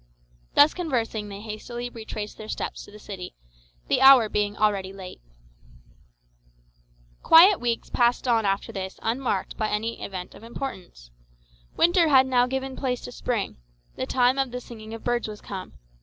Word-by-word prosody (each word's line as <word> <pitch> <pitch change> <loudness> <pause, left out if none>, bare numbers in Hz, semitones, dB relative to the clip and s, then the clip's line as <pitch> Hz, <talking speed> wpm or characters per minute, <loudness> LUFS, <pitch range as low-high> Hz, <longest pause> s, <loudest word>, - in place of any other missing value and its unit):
Thus 295 +2 +7
conversing 230 - -2
they 200 0 -8
hastily 225 +3 -6
retraced 220 -3 -7
their 215 0 -8
steps - - -4
to - - -15
the 210 - -12
city, 195 -3 -8 0.5
the - - +1
hour 265 -5 +8
being 205 0 -1
already 200 -3 +1
late. 190 - -10 2.0
Quiet 360 +4 +7
weeks 235 -1 -2
passed 240 +1 +2
on 230 -2 +3
after 195 +3 -1
this 190 -3 -6
unmarked 230 -4 -2
by 215 -1 -1
any 225 +2 -3
event 185 -2 -6
of - - -14
importance. 190 - -8 0.7
Winter 345 0 +4
had 265 -3 +6
now 250 -1 +3
given 265 0 -3
place 250 -2 -2
to - - -8
spring; 235 - -3 0.4
the 260 - -4
time 255 +1 +2
of 270 -1 +1
the 250 +1 -5
singing 225 -2 -10
of 225 - -11
birds 240 -1 0
was 210 -1 -8
come. 190 -2 -8
230 Hz, 160 wpm, -25 LUFS, 210-255 Hz, 2.0 s, hour